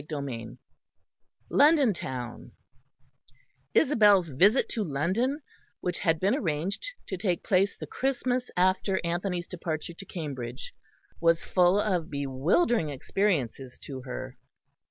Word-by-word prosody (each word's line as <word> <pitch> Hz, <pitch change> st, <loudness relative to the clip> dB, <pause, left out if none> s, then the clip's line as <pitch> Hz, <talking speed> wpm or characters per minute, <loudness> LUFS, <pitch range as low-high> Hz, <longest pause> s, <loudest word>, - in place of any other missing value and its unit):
CHAPTER 145 Hz, -1 st, -5 dB
III 115 Hz, -3 st, -7 dB, 0.9 s
LONDON 290 Hz, -6 st, +5 dB
TOWN 125 Hz, -7 st, -6 dB, 1.2 s
Isabel's 205 Hz, -, +5 dB
visit 200 Hz, -, +4 dB
to 220 Hz, -, -1 dB
London, 190 Hz, -, 0 dB, 0.4 s
which 180 Hz, -1 st, -2 dB
had 165 Hz, -2 st, +1 dB
been 195 Hz, +5 st, +2 dB
arranged 195 Hz, -, -2 dB, 0.2 s
to 190 Hz, -, -4 dB
take 180 Hz, -2 st, -1 dB
place 195 Hz, -1 st, +2 dB
the -, -, -6 dB
Christmas 255 Hz, -1 st, -1 dB
after 185 Hz, +1 st, +2 dB
Anthony's 175 Hz, +1 st, -2 dB
departure 170 Hz, -2 st, -4 dB
to 195 Hz, -, -10 dB
Cambridge, 135 Hz, -9 st, -6 dB, 0.5 s
was 165 Hz, 0 st, +3 dB
full 180 Hz, +2 st, +4 dB
of 185 Hz, -6 st, 0 dB
bewildering 150 Hz, -, +1 dB
experiences 135 Hz, -, -1 dB
to 135 Hz, -2 st, -7 dB
her. 130 Hz, 0 st, -7 dB
175 Hz, 115 wpm, -28 LUFS, 145-205 Hz, 1.2 s, LONDON